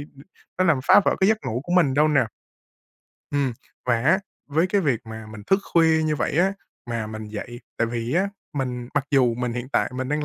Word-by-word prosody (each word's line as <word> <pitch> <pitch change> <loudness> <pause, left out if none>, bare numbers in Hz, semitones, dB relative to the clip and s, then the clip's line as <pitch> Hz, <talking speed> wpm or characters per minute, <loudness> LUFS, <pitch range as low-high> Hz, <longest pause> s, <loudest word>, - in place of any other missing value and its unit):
ưm, 140 - -14 0.3
nó 185 - +3
làm 165 -7 +3
phá - - +8
vỡ - - +3
cái 190 - +4
giấc 220 - +3
ngủ 115 +3 -2
của 175 - -6
mình 165 -7 +4
đâu 150 +2 +4
nè. 145 -5 +3 1.1
Ừm. 140 -3 0 0.3
Và 120 -2 +2
á, 170 +9 +4 0.3
với 160 +5 +2
cái 200 +2 +1
việc 135 - +1
mà 110 0 -8
mình 110 -1 -10
thức 195 - +4
khuya 160 -1 +4
như 155 -1 0
vậy 145 - -1
á, 190 +2 +3 0.4
mà 115 -2 -2
mình 110 0 -7
dậy 120 +3 -7 0.2
tại 115 - +2
vì 115 +2 -3
á, 190 +3 +2 0.2
mình 125 -4 -3
mặc 145 - +1
dù 125 -4 +3
mình 125 0 -2
hiện 125 +2 -5
tại - - +1
mình 130 0 -3
đang 150 +1 -1
135 Hz, 230 wpm, -24 LUFS, 120-160 Hz, 1.1 s, phá